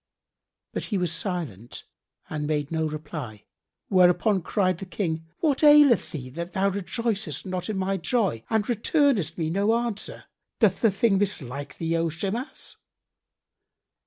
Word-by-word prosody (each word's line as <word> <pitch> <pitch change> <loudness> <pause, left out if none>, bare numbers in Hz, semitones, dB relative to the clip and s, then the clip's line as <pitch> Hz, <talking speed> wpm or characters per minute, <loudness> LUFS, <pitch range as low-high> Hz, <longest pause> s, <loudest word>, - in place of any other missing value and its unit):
But - - -3
he 205 - -1
was 180 -3 +1
silent 165 - -4 0.4
and 150 -1 -3
made 150 -1 -1
no 160 -1 0
reply, 150 -8 -7 0.4
whereupon 185 +2 +4
cried 185 -1 0
the 195 - -6
King, 165 -3 -3
"What 300 -3 +1
aileth 295 -4 +7
thee 130 -6 -6
that 170 +5 -6
thou 195 0 +2
rejoicest 200 - -2
not 185 +1 -4
in 210 - -2
my 190 +1 0
joy 190 - 0
and 220 -2 +1
returnest 235 - +2
me 160 -2 -1
no 200 +5 +2
answer? 235 -3 -3 0.4
Doth 205 -5 +3
the 225 - +5
thing 200 0 +2
mislike 145 -9 -3
thee, 165 0 -1
O 165 0 +1
Shimas?" 200 - -4
185 Hz, 145 wpm, -26 LUFS, 160-215 Hz, 0.4 s, aileth